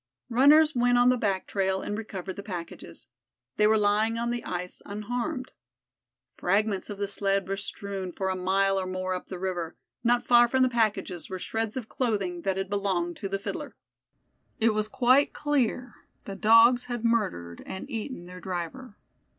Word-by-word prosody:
Runners 295 +6 +6
went 245 0 +3
on 245 +1 +5
the 255 - +4
back 200 -5 -1
trail 190 -1 -1
and 205 - -3
recovered 195 -4 -6
the 200 - -6
packages. 170 - -8 0.5
They 210 - +5
were 220 0 +4
lying 215 +2 +2
on 235 +1 -1
the 240 0 -3
ice 180 0 -5
unharmed. 245 +6 -4 0.9
Fragments 200 +2 +1
of 205 - -5
the 200 0 -2
sled 195 -1 -1
were 195 - -1
strewn 195 -1 -5
for 190 +2 -2
a 190 - -1
mile 195 +1 +2
or 185 - -3
more 185 0 -2
up 180 - -5
the 185 - -6
river; 175 -3 -3 0.3
not 240 0 +2
far 240 0 +6
from 260 +2 +2
the 255 - +3
packages 215 -7 -1
were 190 - -4
shreds 225 +4 -3
of 240 -4 -5
clothing 200 -10 -1
that 190 +1 -1
had 195 0 -2
belonged 190 -4 -1
to 195 - -5
the 195 - -1
Fiddler. 195 - -6 0.8
It 225 -1 +3
was 215 0 -1
quite 255 +5 +3
clear, 255 -5 0 0.3
the 195 - -6
Dogs 230 +4 +6
had 240 -2 -4
murdered 185 - 0
and 190 - -6
eaten 230 -6 -5
their 180 +1 -10
driver. 190 +7 -5
205 Hz, 180 wpm, -27 LUFS, 190-240 Hz, 0.9 s, Runners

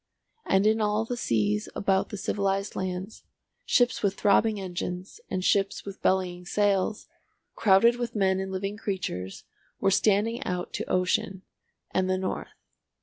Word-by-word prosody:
And 195 +1 +3
in 220 +1 +3
all 210 +1 +1
the 245 - -3
seas 105 - 0
about 195 -1 +1
the 205 - -5
civilised 195 0 -1
lands, 185 +3 -4 0.4
ships 245 0 +3
with 200 -1 +1
throbbing 210 +1 +3
engines, 180 - -5
and 185 0 -2
ships 195 0 +1
with 200 -1 -8
bellying 180 -1 +1
sails, 200 +2 0 0.5
crowded 230 +4 +5
with 240 -1 -4
men 190 -2 +2
and 190 0 -4
living 195 +2 -3
creatures, 175 - -4 0.4
were 195 - +2
standing 215 +5 +2
out 180 -4 -3
to - - -4
ocean 185 +1 0 0.5
and 185 0 +1
the 185 - +2
north. 185 0 -3
195 Hz, 145 wpm, -27 LUFS, 185-210 Hz, 0.5 s, crowded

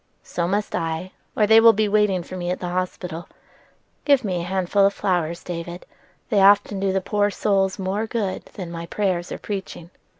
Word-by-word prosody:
"So 170 -1 -2
must 205 +3 -1
I, 165 +2 -3 0.3
or 215 - +4
they 220 +1 +7
will 225 0 +7
be 215 0 +1
waiting 205 -3 +2
for 185 - -9
me 175 -1 -3
at 180 - -2
the 180 - -4
hospital. 180 -2 -4 0.7
Give 280 -3 +4
me 185 -4 -1
a - - -5
handful 190 +2 +1
of 200 0 +3
flowers, 170 -3 -1
David: 175 0 -6 0.4
they 210 -5 +3
often 200 0 +5
do 195 0 +1
the 190 0 0
poor 205 +2 +1
souls 195 -1 0
more 195 +3 -2
good 215 -5 -3
than 180 -4 -6
my 170 0 -6
prayers 180 -3 -1
or - - -4
preaching." 190 -4 -6
190 Hz, 195 wpm, -23 LUFS, 175-205 Hz, 0.7 s, they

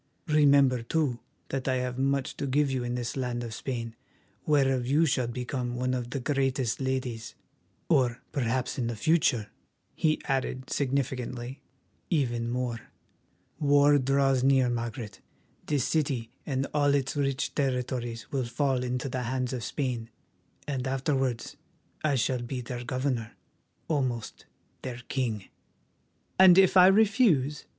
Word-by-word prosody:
Remember, 140 -4 +5
too, 130 0 0 0.3
that 135 -1 -3
I 130 - +2
have 125 0 -2
much 135 0 0
to 140 - -2
give 140 +1 +2
you 130 -2 -1
in 120 0 -2
this 120 -1 -3
land 125 -2 -2
of 115 -2 -6
Spain, 115 -1 -4 0.5
whereof 135 -4 +2
you 150 +5 +4
shall 130 -5 +1
become 125 0 -3
one 130 +1 -1
of 125 -2 -3
the 135 - -3
greatest 135 -2 0
ladies, 130 -4 -3 0.5
or 125 -2 +2
perhaps 130 -1 -1
in 120 - 0
the 120 - -3
future," 125 -5 +2 0.4
he 155 -1 +1
added 130 -1 -2
significantly, 130 -2 -2 0.5
"even 120 -8 0
more. 120 -1 -2 0.8
War 145 0 +5
draws 135 -1 +2
near, 135 -2 +4
Margaret; 115 -2 -5 0.5
this 145 -4 +1
city 135 -7 -1 0.2
and 135 -2 0
all 145 -1 +3
its 135 0 -1
rich 140 -2 -1
territories 125 -4 -2
will 135 -4 -1
fall 130 +1 0
into 125 +1 -2
the 130 -1 -3
hands 130 +1 -2
of 125 -2 -4
Spain, 120 -3 -3 0.6
and 135 -2 -2
afterwards 135 -3 -1 0.5
I 150 -2 +2
shall 125 0 0
be 125 +1 -4
their 120 0 -6
governor, 125 -2 -2 0.5
almost 130 -7 -2 0.3
their 125 -1 -6
king." 115 -7 -2 0.9
"And 190 -1 +8
if 190 -1 +6
I 185 0 +9
refuse?" 195 - +3
130 Hz, 140 wpm, -28 LUFS, 120-140 Hz, 0.9 s, I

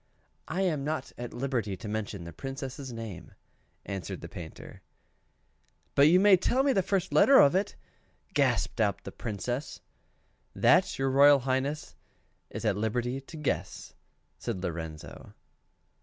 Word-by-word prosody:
"I 185 - -2
am 160 -7 0
not 150 -2 -3
at 120 0 -6
liberty 120 -6 -2
to 105 - -8
mention 105 -3 -4
the 85 -1 -9
Princess' 135 - -6
name," 115 -6 -8 0.5
answered 95 -4 -5
the - - -7
Painter. 85 -3 -10 1.1
"But 140 +1 +6
you 175 +4 +6
may 200 -1 +7
tell 250 +8 +1
me 275 -1 +3
the 195 - +3
first 190 0 -1
letter 275 0 +7
of 140 - +6
it," 190 +2 0 0.6
gasped - - +1
out - - 0
the - - -7
Princess. 120 +5 -4 0.8
"That - - +4
your 135 0 0
Royal 140 +1 +6
Highness 135 +4 -2 0.5
is - - -6
at 105 -2 +1
liberty 120 +5 -1
to 155 +4 -11
guess," 150 -3 -3 0.5
says 115 - -3
Lorenzo. 80 -4 -7
130 Hz, 140 wpm, -29 LUFS, 105-150 Hz, 1.1 s, may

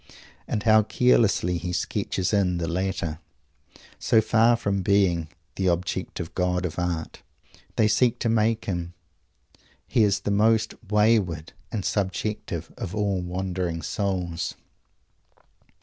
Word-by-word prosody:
And 105 - -2
how 110 -1 +6
carelessly 105 -6 +2
he 90 +2 -4
"sketches 90 +2 -1
in" 95 -4 +2
the 85 -1 -2
latter! 85 -3 -2 0.8
So 110 - +4
far 115 +2 +4
from 100 -4 -1
being 90 -4 +2 0.3
"the 95 - 0
Objective 85 -1 -2
God 90 0 0
of 85 0 -4
Art" 85 -2 -3 0.5
they 110 - +4
seek 120 +2 +3
to - - +1
make 115 0 +1
him, 85 -2 -3 0.9
he 115 - +1
is 100 -1 +2
the 105 - -2
most 110 +2 +3 0.2
wayward 105 -7 +2 0.2
and 105 -5 -3
subjective 95 -3 -2
of 95 +3 -4
all 100 -3 0
wandering 90 -2 -3
souls. 90 -4 -2
95 Hz, 125 wpm, -25 LUFS, 90-105 Hz, 0.9 s, how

